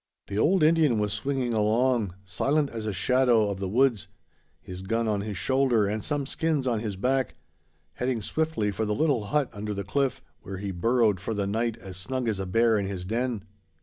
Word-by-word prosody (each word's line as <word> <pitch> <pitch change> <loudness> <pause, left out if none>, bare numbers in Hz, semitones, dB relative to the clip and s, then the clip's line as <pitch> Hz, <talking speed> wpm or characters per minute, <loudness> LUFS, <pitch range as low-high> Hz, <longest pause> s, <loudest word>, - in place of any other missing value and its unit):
The 100 +1 -3
old 175 - +3
Indian 155 -6 +4
was 105 -1 0
swinging 125 +2 -1
along, 110 -2 +2
silent 140 - 0
as 110 -2 -5
a - - 0
shadow 120 0 +3
of 95 - -5
the 95 -1 -2
woods, 120 -2 +2 0.5
his 90 0 -9
gun 115 +4 -1
on 105 -2 0
his 105 -2 -4
shoulder 130 -2 +2
and 105 +2 -2
some 145 -2 -1
skins 155 -1 0
on 120 -4 +1
his 105 -3 -4
back, 130 +6 0 0.6
heading 125 -3 -2
swiftly 155 -7 -1
for 100 +3 -2
the 105 - 0
little 140 -8 +1
hut 145 +4 0
under 105 0 -4
the 100 - -3
cliff, 135 +5 0 0.2
where 95 -1 -7
he 100 +1 -4
burrowed 110 +2 +2
for 110 +4 -3
the 100 -1 0
night 115 +3 -1
as 95 -5 -8
snug 125 +6 -3
as 105 -3 -1
a 95 - -3
bear 115 +2 +3
in 100 - -2
his 95 -2 -5
den. 115 0 -2
115 Hz, 205 wpm, -27 LUFS, 100-130 Hz, 0.6 s, Indian